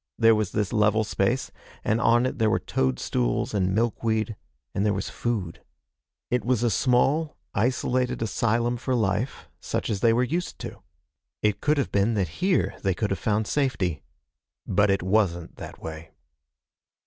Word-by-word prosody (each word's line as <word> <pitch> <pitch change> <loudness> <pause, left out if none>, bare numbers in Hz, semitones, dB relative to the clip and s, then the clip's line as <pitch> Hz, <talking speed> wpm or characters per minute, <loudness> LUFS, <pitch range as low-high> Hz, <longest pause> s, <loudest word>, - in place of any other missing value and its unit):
There 115 0 +6
was 105 -4 0
this 105 -1 -1
level 110 0 +3
space, 110 +5 0 0.3
and 110 +2 +1
on 120 +1 +4
it 130 +1 -3
there 110 -1 +3
were 110 - +3
toadstools 60 - -1
and 95 -2 +1
milkweed, 110 -1 0 0.4
and 100 - 0
there 105 -1 +2
was 95 - -3
food. 100 -8 -3 0.7
It 125 -3 +1
was 120 0 +1
a 120 - +2
small, 135 - +2 0.2
isolated 125 +2 0
asylum 120 +2 0
for 130 +1 -1
life 110 +2 -1
such - - -2
as 100 - -1
they 115 +3 +4
were 120 +2 +3
used 170 +8 -2
to. - - -7 0.6
It 105 -1 +1
could 150 0 +2
have 140 - 0
been 100 +3 +2
that 95 -5 0
here 185 0 +1
they 95 -2 +1
could 105 0 -1
have 95 - -1
found 110 0 +1
safety. 100 - 0 0.6
But 100 +2 +2
it 95 -2 +1
wasn't 95 -4 0
that - - -8
way. 80 0 -7
110 Hz, 165 wpm, -26 LUFS, 100-120 Hz, 0.7 s, There